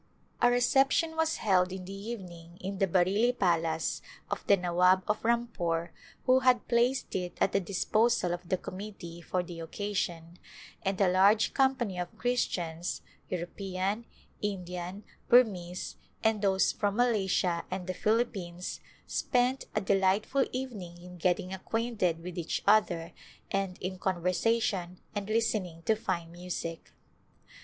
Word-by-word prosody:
A 245 - +6
reception 270 +6 +3
was 320 0 +1
held 185 -3 +2
in 185 -1 -6
the 195 - -7
evening 180 -5 -8
in 195 +1 -5
the 195 - +3
Bareilly 195 +7 +3
palace 165 -3 +1 0.3
of - - -2
the 200 - +6
Nawab 180 +1 +3
of 210 - 0
Rampore 175 -8 0 0.3
who 255 0 +6
had 255 -2 +3
placed 245 +2 +1
it 180 -2 -3
at - - +3
the 195 - +2
disposal 200 0 +1
of 175 0 -7
the 185 - +2
committee 185 -3 -8
for 180 +2 -1
the 175 -1 -8
occasion, 170 -1 -3 0.4
and 195 0 -1
a 195 - +5
large 195 +4 +4
company 260 -9 +1
of 175 -1 -5
Christians 175 -8 -1
— - - -35
European, 190 +4 -3 0.4
Indian, 180 -1 -4 0.3
Burmese 185 -8 +3 0.3
and 220 -2 +2
those 190 -2 +3
from 205 -1 -1
Malaysia 195 -7 +2
and 185 -1 -4
the 185 - -2
Philippines 195 -6 -1 0.3
spent 250 +2 +1
a - - +2
delightful 195 +7 +2
evening 210 -10 -5
in 180 +1 -11
getting 180 +1 0
acquainted 190 -4 -1
with 180 0 -5
each 165 - -2
other 180 -6 +3 0.4
and 195 -2 -1
in 185 0 -5
conversation 185 +1 0
and 205 -2 -3
listening 215 -7 0
to 220 - +3
fine 170 -6 -3
music. 170 -1 -6
190 Hz, 140 wpm, -30 LUFS, 175-220 Hz, 0.4 s, A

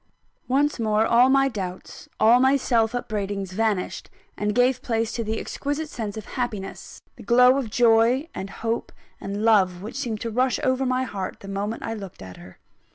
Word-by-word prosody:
Once 280 +2 +1
more, 215 -1 +2
all 240 +3 +5
my 270 0 +4
doubts, 190 -7 -7
all 235 +3 +6
my 265 +2 +4
self 235 -3 +1
upbraidings 200 -5 -3
vanished, 210 -2 -2 0.3
and 210 0 -2
gave 250 +1 +3
place 225 -2 -1
to 230 - -3
the 220 +1 -2
exquisite 290 +2 -3
sense 220 -7 -5
of 215 - -7
happiness, 225 -7 -5
the - - -11
glow 250 +1 +5
of 245 -5 -4
joy 235 +5 +3
and 195 - -6
hope 225 +4 -3 0.3
and 200 +2 -4
love 190 -5 +3
which 215 - -7
seemed 235 -6 -3
to 230 - -4
rush 250 +2 +1
over 260 -1 +1
my 255 0 +1
heart, 200 -7 -5
the 195 - -10
moment 200 +3 -4
I 225 - -3
looked 195 - -9
at 95 -1 -10
her. 90 +1 -14
225 Hz, 185 wpm, -24 LUFS, 205-255 Hz, 0.3 s, all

